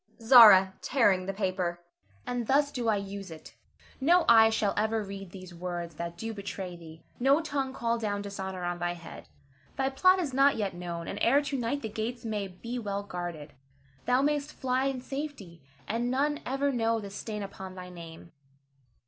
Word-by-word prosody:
Zara 220 -6 +8
[tearing 200 -8 +2
the - - 0
paper]. 185 -3 -2 0.5
And 245 -2 -3
thus 285 +1 +3
do 245 -4 -3
I 220 - +3
use 200 -1 -6
it! 160 -1 -11 0.5
No 340 +5 +4
eye 225 -1 +7
shall 215 -2 0
ever 220 +1 0
read 195 -1 -8
these 185 -1 -11
words 175 -1 -5
that 170 0 -5
do 225 +5 -4
betray 195 -3 -6
thee; 160 -1 -13 0.2
no 275 +4 +4
tongue 285 -4 -2
call 235 -2 -1
down 205 -2 -2
dishonor 190 -2 -5
on 175 0 -2
thy 175 0 -1
head. 170 -1 -11 0.5
Thy 270 0 0
plot 370 +7 +5
is 320 -8 -2
not 275 +2 +4
yet 205 -3 -2
known, 170 -1 -6
and 200 - -5
ere 275 +5 +4
to 280 -1 -3
night 255 +2 -2
the - - -2
gates 225 +3 -4
may 210 -3 -2
be 235 +7 -6
well 200 -2 -3
guarded. 175 -6 -6 0.5
Thou 250 +2 +3
mayst 295 0 0
fly 260 0 0
in 270 -2 -2
safety, 270 - -7 0.3
and 235 +2 -1
none 290 +3 0
ever 275 +2 0
know 230 -2 +1
the 200 -2 -8
stain 210 +1 -5
upon 190 -1 -8
thy 180 -1 -8
name. 170 -1 -11
215 Hz, 185 wpm, -29 LUFS, 185-260 Hz, 0.5 s, Zara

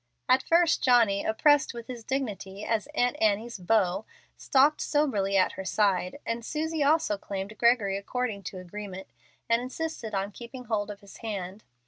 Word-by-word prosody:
At 255 +1 +5
first 335 +2 +3
Johnny, 230 -6 +4
oppressed 285 +4 +3
with 235 -1 -7
his 240 -1 -8
dignity 210 -6 -4
as 225 +2 0
Aunt 245 -3 +2
Annie's 220 +1 +1
"beau," 195 +1 +1 0.3
stalked 285 +3 +3
soberly 210 -10 +1
at 185 - +3
her 190 - -7
side, 190 0 +1
and 230 0 -3
Susie 315 +4 -2
also 285 -8 +2
claimed 200 +2 -5
Gregory 230 -5 +3
according 220 0 -3
to 185 - -6
agreement, 190 +1 -7 0.4
and 230 +1 +3
insisted 255 -4 -4
on 195 +1 -1
keeping 245 +4 -9
hold 215 -3 -2
of 205 0 -8
his 200 -1 -14
hand. 200 -2 -5
220 Hz, 160 wpm, -28 LUFS, 200-255 Hz, 0.4 s, At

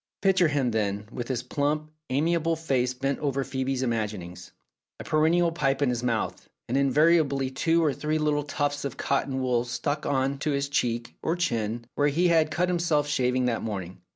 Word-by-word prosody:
Picture 190 -3 +4
him, 140 -5 0
then, 105 -1 -1
with 120 0 -5
his 125 -2 -2
plump, 150 +4 -1 0.2
amiable 165 +4 +1
face 135 -6 0
bent 135 +2 -2
over 140 -2 -1
Phoebe's 130 0 -2
imaginings, 105 -7 -3 0.5
a - - -6
perennial 165 +2 +3
pipe 135 -5 0
in 135 - +2
his 120 -1 -1
mouth, 120 -3 -2 0.2
and, 125 - -2
invariably, 140 -1 +3
two 165 +5 +2
or 145 - +2
three 155 +2 -1
little 150 -1 +1
tufts 145 0 -2
of 140 -3 -4
cotton 135 -1 -1
wool 125 -2 +1
struck 130 +5 -3
on 135 0 0
to 155 - -1
his 140 -1 0
cheek 120 -4 -1
or 165 - 0
chin, 115 -9 -1
where 145 - +2
he 170 +5 +2
had 160 -2 +4
cut 175 +3 0
himself 170 -4 +1
shaving 130 -3 +1
that 120 -2 0
morning. 95 -4 -5
140 Hz, 180 wpm, -27 LUFS, 125-155 Hz, 0.5 s, Picture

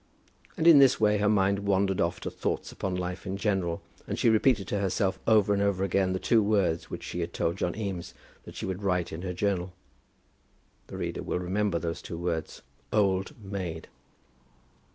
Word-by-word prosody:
And 160 - -1
in 165 -4 +9
this 135 -2 +5
way 105 -1 +3
her 105 0 +2
mind 100 -1 +3
wandered 100 -1 +1
off 85 0 0
to - - -4
thoughts - - -3
upon 95 -1 -3
life 90 0 -4
in 95 +1 -3
general, 95 -5 -1 0.2
and - - -3
she 115 - +4
repeated 110 -2 +3
to 100 - 0
herself 95 0 0
over 105 -2 +4
and 100 - +1
over 100 -2 +1
again 95 0 +1
the 95 - 0
two 115 +4 +3
words 100 -6 +1
which - - -6
she 90 - -5
had 85 0 -3
told 85 +2 -1
John 90 -2 -1
Eames 100 -5 -5 0.3
that - - -11
she - - -4
would 95 +1 -4
write 90 -3 0
in 80 - -5
her 95 -1 -3
journal. 90 -1 -1 1.1
The - - -8
reader - - -3
will - - -2
remember 95 +1 0
those 85 -1 -4
two 85 - -7
words; 85 -2 -3 0.3
Old 100 +2 +1
Maid. 95 -5 -5
95 Hz, 195 wpm, -28 LUFS, 90-105 Hz, 1.1 s, in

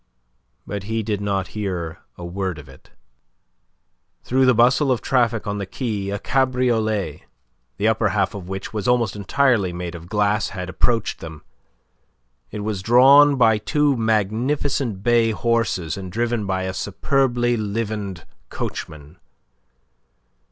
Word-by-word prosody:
But 100 -1 -5
he 110 +1 -2
did 105 -1 -2
not 100 -2 -1
hear 90 -6 -4 0.2
a 85 - -7
word 95 0 -3
of 75 -2 -11
it. 65 0 -17 1.3
Through 130 +1 +2
the 125 - +5
bustle 125 +4 +4
of 125 - +1
traffic 120 -4 +1
on 105 -1 -3
the 100 - -4
quay 105 -3 -3
a 100 - -2
cabriolet, 115 - 0 0.5
the 105 - +1
upper 110 -1 +2
half 95 -1 0
of 95 -3 -8
which 95 +2 -5
was 105 -2 -3
almost 120 -4 +2
entirely 105 -1 +1
made 90 0 -5
of 85 0 -10
glass, 105 0 +1
had 90 0 -4
approached 115 +3 0
them. 80 -2 -9 1.1
It 105 - -6
was 105 -2 -3
drawn 135 +6 +6
by 110 -4 +4
two 150 +4 +1
magnificent 115 +1 0
bay 120 -1 +3
horses 105 -5 -1
and 95 -2 -7
driven 115 0 -1
by 95 -1 -1
a 95 0 -3
superbly 120 +4 0
livened 105 -4 -3 0.2
coachman. 75 +2 -6
105 Hz, 140 wpm, -22 LUFS, 95-120 Hz, 1.3 s, drawn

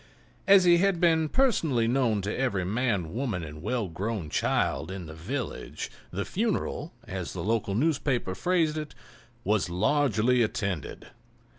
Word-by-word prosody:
As 195 -1 +8
he 175 -1 +6
had 195 -2 +2
been 160 -2 +3
personally 160 - +2
known 115 -5 +1
to 105 - -2
every 100 -8 0
man, 100 -5 -1
woman 115 -8 -2
and 75 0 -8
well 115 +2 -1
grown 90 -1 -4
child 80 - 0
in 95 -2 -6
the 80 - -9
village, 105 - -5 0.2
the 100 +3 -3
funeral, 205 -6 -2
as 95 -6 -5
the - - -4
local 105 -2 0
newspaper 135 -6 0
phrased 160 - +1
it, 150 -1 -7 0.5
"was 105 -3 +1
largely 120 +4 +2
attended." 100 - -2
115 Hz, 145 wpm, -28 LUFS, 95-150 Hz, 0.5 s, As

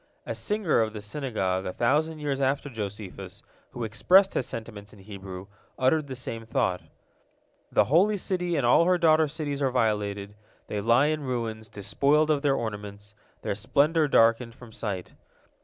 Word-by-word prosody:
A - - -3
singer 205 - 0
of 110 -1 -1
the 105 - -6
Synagogue 105 -6 -2
a 90 - -4
thousand 150 +6 +1
years 145 -2 -2
after 135 +1 0
Josephus, 105 -3 -7 0.3
who 120 - -6
expressed 180 - +4
his 125 - -1
sentiments 105 -3 -8
in - - -15
Hebrew, 95 -2 -9 0.3
uttered 145 +3 +2
the 130 - -6
same 115 -2 -6
thought: 110 - -1 0.9
"The - - +4
Holy 195 +9 +3
City 180 -2 -1
and 140 - +1
all 125 +8 +5
her 180 0 +3
daughter 160 -2 +4
cities 145 -2 -4
are 135 - +2
violated, 105 -4 -1 0.3
they 105 - -3
lie 120 +6 +4
in 155 0 0
ruins, 115 -4 -4
despoiled 145 +10 +1
of 145 -2 +1
their 140 -2 +2
ornaments, 105 -3 -6 0.3
their - - -1
splendor 150 +9 +2
darkened 115 -2 +3
from 120 -3 -13
sight. 100 -5 -5
120 Hz, 165 wpm, -27 LUFS, 105-150 Hz, 0.9 s, all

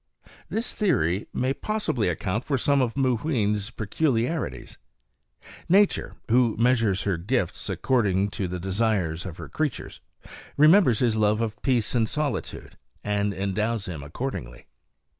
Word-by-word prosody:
This 230 +2 -2
theory 110 - +1
may 130 +2 0
possibly 175 - -1
account 95 +7 -2
for 140 -3 0
some 140 +2 +2
of 125 0 -1
Mooween's 115 -6 0
peculiarities. 125 +5 -2 0.9
Nature, 200 +3 +3
who 120 -1 +3
measures 115 -5 +2
her 95 -4 0
gifts 95 +1 -2
according 100 -6 +1
to 100 -3 -3
the 90 +1 -4
desires 95 -3 -1
of 85 -2 -8
her - - -8
creatures, 155 -5 -3 0.6
remembers 155 - +6
his 115 -2 +1
love 105 0 +2
of 115 -1 -3
peace 125 -5 +1
and 115 -3 +1
solitude, 150 -2 -3 0.2
and 105 0 0
endows 100 +2 -1
him 85 -6 -6
accordingly. 70 - -6
115 Hz, 130 wpm, -25 LUFS, 100-130 Hz, 0.9 s, remembers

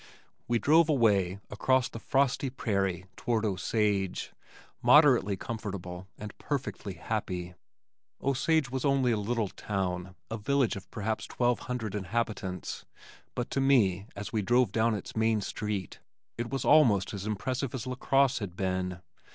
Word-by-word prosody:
We 120 - +2
drove 160 +6 +4
away 100 - +3
across 130 +4 +2
the 115 - -8
frosty 135 +2 +1
prairie 95 -7 -1
toward 115 -2 0
Osage 100 -1 0 0.5
moderately 125 -10 +5
comfortable 95 -4 -6
and 105 -1 -8
perfectly 130 -8 -4
happy. 90 -2 -3 0.7
Osage 140 +1 +1
was 130 -1 -2
only 135 -3 +3
a 110 - +1
little 110 0 -1
town, 90 -3 -3 0.2
a 110 - -2
village 135 +1 +1
of 100 - -9
perhaps 110 0 -3
twelve 120 -1 +1
hundred 115 -5 -3
inhabitants, 105 -2 -3 0.5
but 120 - -3
to 135 - +1
me 105 -8 +3
as 100 +3 -6
we 110 - +1
drove 120 +1 +3
down 115 +1 +2
its 100 - -7
Main 110 -1 +2
Street, 105 -2 -4 0.4
it 120 0 -4
was 135 +2 -2
almost 110 -12 +5
as 100 +1 -5
impressive 125 +5 -2
as 125 - -4
LaCrosse 135 +1 +2
had 95 -5 -6
been. 95 -1 -2
110 Hz, 145 wpm, -29 LUFS, 95-125 Hz, 0.7 s, moderately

